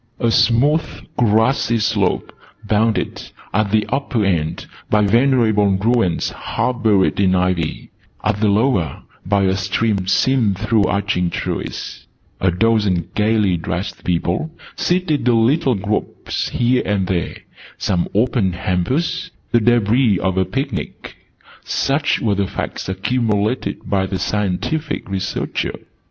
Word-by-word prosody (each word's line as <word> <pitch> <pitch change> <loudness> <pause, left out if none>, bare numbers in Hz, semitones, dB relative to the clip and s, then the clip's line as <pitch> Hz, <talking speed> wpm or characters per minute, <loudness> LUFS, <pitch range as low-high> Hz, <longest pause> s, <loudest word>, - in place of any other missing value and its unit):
A 115 - +2
smooth 140 +9 +2
grassy 115 +1 +2
slope, 105 -4 0 0.3
bounded, 110 +1 0 0.3
at 105 -1 +1
the 105 +1 +2
upper 130 -6 0
end, 80 -5 -1 0.2
by 105 -1 +3
venerable 115 -2 +3
ruins 100 0 +1
half 125 -1 -2
buried 100 -5 +2
in 95 -2 +3
ivy, 90 -3 -1 0.3
at 105 - 0
the 110 - +3
lower, 100 - +1 0.2
by 100 0 +2
a 95 0 +2
stream 95 0 0
seen 115 -1 +2
through 105 +2 +1
arching 95 -2 0
trees - - -5 0.3
a 95 - +2
dozen 95 -2 +1
gaily 105 -4 +2
dressed 85 +3 -4
people, 90 - -1 0.3
seated 175 -7 0
in 115 -2 +4
little 135 0 +2
groups 100 +2 -3
here 125 +1 +2
and 100 -2 0
there 90 -2 -2 0.4
some 90 -3 0
open 110 -4 +2
hampers 95 - -1 0.2
the 120 - +4
debris 120 -1 +3
of 95 +1 -1
a 95 0 +2
picnic 135 +5 -4 0.5
such 140 +2 0
were 110 -3 +1
the 100 -1 0
Facts - - -5
accumulated 105 +1 -1
by 95 -1 0
the 95 - -3
Scientific 105 - -2
Researcher. 95 0 -3
105 Hz, 125 wpm, -19 LUFS, 95-120 Hz, 0.5 s, in